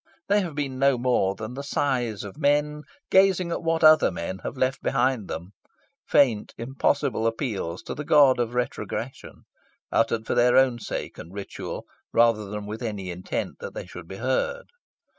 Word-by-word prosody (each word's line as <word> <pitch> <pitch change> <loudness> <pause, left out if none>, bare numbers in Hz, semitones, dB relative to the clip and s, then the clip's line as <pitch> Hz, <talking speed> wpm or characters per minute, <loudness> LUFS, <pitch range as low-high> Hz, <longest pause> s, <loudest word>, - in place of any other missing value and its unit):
They 205 +1 +4
have 170 -6 -5
been 135 -3 -3
no 135 -1 +4
more 120 -6 +1
than 110 +4 -6
the 135 - -5
sighs 130 - -1
of 100 -2 -8
men 150 +1 +1 0.3
gazing 190 -2 +4
at - - -2
what 165 0 0
other 155 0 +7
men 95 +3 -5
had - - -6
left 130 +1 0
behind 130 -5 +1
them; 85 +4 -6 0.6
faint, 115 -7 +3
impossible 120 -1 0
appeals 110 - -3
to - - -5
the 150 - -5
god 145 -4 +5
of 120 0 -1
retrogression, 125 0 -4 0.5
uttered 115 0 +1
for - - -1
their 125 0 +4
own 130 -2 +4
sake - - -5
and 85 - -9
ritual, 100 -1 -6 0.3
rather 115 -2 +3
than 105 0 -5
with 110 +3 -6
any 105 -6 -4
intent 90 +1 -4
that 485 0 -8
they - - -5
should - - -10
be - - -8
heard. - - -1
125 Hz, 175 wpm, -25 LUFS, 110-145 Hz, 0.6 s, other